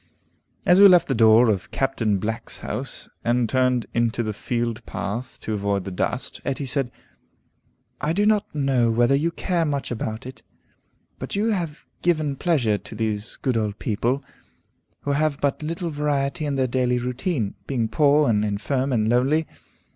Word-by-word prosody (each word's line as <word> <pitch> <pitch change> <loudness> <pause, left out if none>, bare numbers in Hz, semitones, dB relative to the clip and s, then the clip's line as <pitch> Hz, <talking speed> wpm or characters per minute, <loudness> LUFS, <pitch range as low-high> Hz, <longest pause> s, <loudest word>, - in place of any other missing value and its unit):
As 180 +2 +6
we 200 - +11
left 180 -2 +6
the 135 - +1
door 115 0 +6
of 100 -5 0
Captain 125 -7 0
Black's 110 +4 -4
house, - - -4 0.2
and 120 0 +2
turned 125 0 +1
into 120 0 +1
the 110 -1 -2
field 115 +1 -2
path 115 +6 -5
to 110 - -3
avoid 100 -1 -1
the 95 - -6
dust, 110 +7 -2
Etty 140 +1 -2
said, 130 -1 -1 1.1
"I 150 - 0
do 205 +5 +2
not 210 -1 +3
know 135 -5 +2
whether 120 +3 +3
you 150 +5 +2
care 170 0 -1
much 145 -4 -2
about 110 -1 -4
it, 130 +1 -9 0.8
but - - -5
you 215 +3 +1
have 170 -7 -3 0.2
given 155 -5 +1
pleasure 130 - +1
to - - -11
these 110 -1 -2
good 130 -3 -1
old 105 -2 -1
people, 120 +6 -1 0.8
who 145 - -2
have 145 0 +1
but 140 +1 0
little 165 +2 -3
variety 145 0 -1
in 140 - -1
their 130 -1 +2
daily 125 0 +1
routine, 125 - -2
being 120 -5 0
poor, 145 +4 +3
and 105 -2 +2
infirm, 130 +7 -1
and 110 -3 +1
lonely. 135 +7 +2
130 Hz, 170 wpm, -23 LUFS, 115-150 Hz, 1.1 s, we